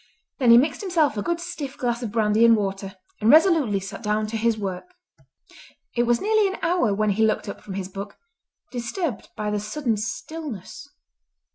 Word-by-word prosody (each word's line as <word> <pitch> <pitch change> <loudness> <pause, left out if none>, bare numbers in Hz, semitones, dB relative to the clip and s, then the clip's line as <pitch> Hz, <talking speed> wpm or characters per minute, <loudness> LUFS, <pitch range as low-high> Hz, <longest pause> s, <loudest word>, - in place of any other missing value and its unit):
Then 250 -3 +3
he 235 - +9
mixed 290 - +2
himself 335 - +1
a 205 - -2
good 340 +8 -1
stiff 320 -6 -6
glass 240 -2 -1
of 230 -4 -4
brandy 215 0 +2
and 230 -1 +7
water 195 -1 -3 0.2
and 215 - +2
resolutely 310 - +5
sat 195 +3 -8
down 210 -1 0
to 225 - -5
his 225 0 +1
work. 200 - -5 1.0
It 240 0 +1
was 240 0 +3
nearly 430 0 +3
an 385 - -4
hour 340 - +2
when 210 +1 +1
he 215 +3 +1
looked 220 0 +1
up 200 - -7
from 195 - -8
his 190 -2 -4
book, 200 +1 -8 0.5
disturbed 245 - -4
by 210 0 -2
the 210 - 0
sudden 225 +2 -2
stillness. 270 - -6
230 Hz, 185 wpm, -24 LUFS, 210-300 Hz, 1.0 s, he